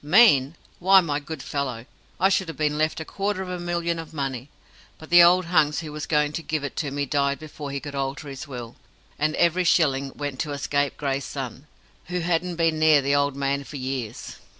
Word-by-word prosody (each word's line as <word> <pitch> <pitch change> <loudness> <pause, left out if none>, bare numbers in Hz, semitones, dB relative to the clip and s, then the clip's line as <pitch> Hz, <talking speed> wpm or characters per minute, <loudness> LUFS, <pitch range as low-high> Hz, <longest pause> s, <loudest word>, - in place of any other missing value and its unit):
"Mean! 150 - +5 0.2
Why, 190 +2 +7
my 150 -5 -1
good 150 -1 -7
fellow, 130 -5 -3 0.3
I 190 - +4
should 190 -2 +1
have 165 -4 -7
been 150 0 0
left 155 +1 0
a 160 - -5
quarter 195 +1 -2
of 185 - -8
a 180 -1 -4
million 170 -1 -2
of 165 -1 -9
money, 135 -2 -3 0.5
but 160 - -13
the 175 0 +9
old 180 +1 +6
hunks 155 -3 +2
who 155 -2 -7
was 150 0 -6
going 150 -1 +2
to 165 - -3
give 155 -2 -3
it 145 - -5
to 150 - -1
me 140 +1 -2
died 140 0 0
before 150 -2 -8
he 140 0 -3
could 145 0 -8
alter 135 +1 -3
his 135 -1 -7
will, 120 -4 -8 0.4
and 155 +1 +1
every 170 +1 +3
shilling 140 -5 +2
went 145 -3 -5
to 150 -2 -2
a - - -4
scapegrace 140 -1 -1
son, 135 +1 -6 0.4
who 180 0 -3
hadn't 175 +1 0
been 165 -1 +1
near 155 -3 +5
the 140 +1 +1
old 140 -1 +2
man 140 0 -1
for 145 - -10
years. 130 -4 -5
150 Hz, 220 wpm, -24 LUFS, 140-165 Hz, 0.5 s, the